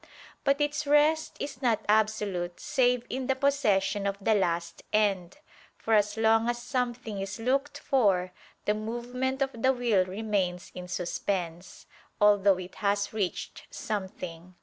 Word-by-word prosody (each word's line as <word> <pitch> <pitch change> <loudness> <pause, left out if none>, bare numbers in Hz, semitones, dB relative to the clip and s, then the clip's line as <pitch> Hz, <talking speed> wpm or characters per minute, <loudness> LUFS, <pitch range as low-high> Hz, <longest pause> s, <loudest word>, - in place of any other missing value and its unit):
But 275 0 +2
its 295 0 -1
rest 300 +2 +3
is 275 -2 -5
not 235 -5 +1
absolute 210 -5 +1
save 250 -5 +1
in 260 0 -3
the 265 - +2
possession 205 -8 +1
of 200 0 -2
the 220 +2 +2
last 170 -4 -1
end: 195 -3 +1 0.4
for 225 - -1
as 210 0 +3
long 225 +1 +3
as 240 - 0
something 240 -4 -3
is 195 +1 -5
looked 275 +5 0
for, 200 -11 +2 0.3
the 210 - +3
movement 245 +5 -2
of 270 - -3
the 260 - +5
will 240 -7 +2
remains 190 -2 -2
in 180 0 -7
suspense, 175 -1 -3 0.3
although 205 -2 +5
it 185 0 -8
has 200 0 0
reached 205 -4 -3
something. 185 -4 -6
215 Hz, 145 wpm, -28 LUFS, 190-250 Hz, 0.4 s, the